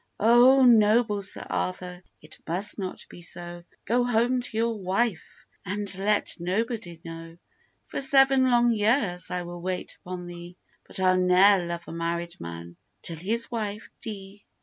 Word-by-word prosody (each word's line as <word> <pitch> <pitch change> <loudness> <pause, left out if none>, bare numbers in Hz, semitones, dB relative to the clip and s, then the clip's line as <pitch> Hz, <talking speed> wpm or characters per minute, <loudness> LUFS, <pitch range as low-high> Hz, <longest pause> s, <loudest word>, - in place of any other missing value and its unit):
'Oh, 245 +4 +6
noble 220 -2 +4
Sir 195 - -2
Arthur, 180 -1 -4 0.2
it 155 +1 -15
must 190 +6 -1
not 185 -2 -6
be 175 - -12
so, 175 0 -7 0.2
Go 245 +2 +2
home 245 +1 +1
to 240 -2 -1
your 230 0 +1
wife, 195 +1 -2 0.2
and 200 0 -2
let 205 +2 0
nobody 185 -1 -3
know; 165 0 -9 0.5
For - - -4
seven 270 -1 +5
long 240 -1 +4
years 210 -5 +1
I 180 0 -3
will 175 0 -8
wait 185 0 -4
upon 180 0 -6
thee, 175 0 -10 0.3
But - - -6
I'll 185 -1 +3
ne'er 185 0 +4
love 170 0 -5
a - - -7
married 170 +1 -4
man 85 0 -8 0.3
till 165 - -4
his 220 +8 -2
wife 215 -2 -4
dee. 205 -2 -8
195 Hz, 155 wpm, -26 LUFS, 175-230 Hz, 0.5 s, Oh